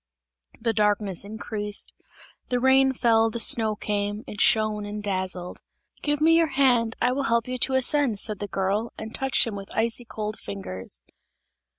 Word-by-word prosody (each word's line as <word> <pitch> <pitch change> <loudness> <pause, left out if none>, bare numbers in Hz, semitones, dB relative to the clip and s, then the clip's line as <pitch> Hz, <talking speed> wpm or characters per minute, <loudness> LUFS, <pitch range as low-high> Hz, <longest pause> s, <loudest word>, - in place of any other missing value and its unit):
The 230 0 0
darkness 205 -3 +1
increased, 210 0 -4 0.6
the 250 - +1
rain 265 +1 +5
fell, 225 -3 +3
the 235 - -4
snow 220 -1 +4
came; 205 0 -2
it 205 - -5
shone 215 -2 +3
and 205 0 -6
dazzled. 185 -2 -3 0.4
"Give 295 -1 0
me 325 +2 +5
your 330 -1 +4
hand, 240 -5 +3
I 245 - +2
will 275 +2 -1
help 235 -1 +1
you 255 0 -3
to 265 +2 +1
ascend!" 260 -4 +2
said 215 -1 -2
the 205 - -4
girl, 200 +4 -1
and 220 0 -7
touched 270 -1 +2
him 225 -3 -4
with 195 -1 -8
icy 230 +2 +1
cold 215 -1 -5
fingers. 95 -9 -6
220 Hz, 170 wpm, -25 LUFS, 205-245 Hz, 0.6 s, rain